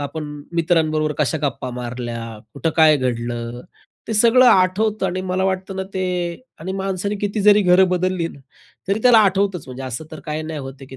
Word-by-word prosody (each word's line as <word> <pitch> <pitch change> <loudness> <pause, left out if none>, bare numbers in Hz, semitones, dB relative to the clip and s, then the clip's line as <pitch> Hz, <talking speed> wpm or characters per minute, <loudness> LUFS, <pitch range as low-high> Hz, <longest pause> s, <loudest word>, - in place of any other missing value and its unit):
आपण 150 +2 -5 0.3
मित्रांबरोबर 155 -2 +1
कशा 150 +2 0
गप्पा 130 -2 -2
मारल्या, 120 -2 -6 0.2
कुठं 165 - -1
काय 155 -2 +6
घडलं, 120 -1 -3 0.5
ते - - -1
सगळं 235 +4 +5
आठवतं 200 0 +3
आणि 185 +1 -2
मला 185 0 -1
वाटतं 190 0 -2
ना 190 - -2
ते 185 - -1 0.6
आणि 190 +3 -4
माणसाने 195 +1 -2
किती 205 +1 -1
जरी 210 0 +6
घरं 185 +1 +5
बदलली 180 -1 0
ना, - - -13 0.5
तरी 200 +2 +1
त्याला 245 -3 +7
आठवतंच. 195 -4 +2
म्हणजे 130 +1 -8
असं 130 +4 -5
तर 155 - -8
काही 155 0 -3
नाही 155 -1 -5
होत 135 0 -7
आहे, 135 - -10
की 130 - -11
170 Hz, 185 wpm, -20 LUFS, 135-190 Hz, 0.6 s, त्याला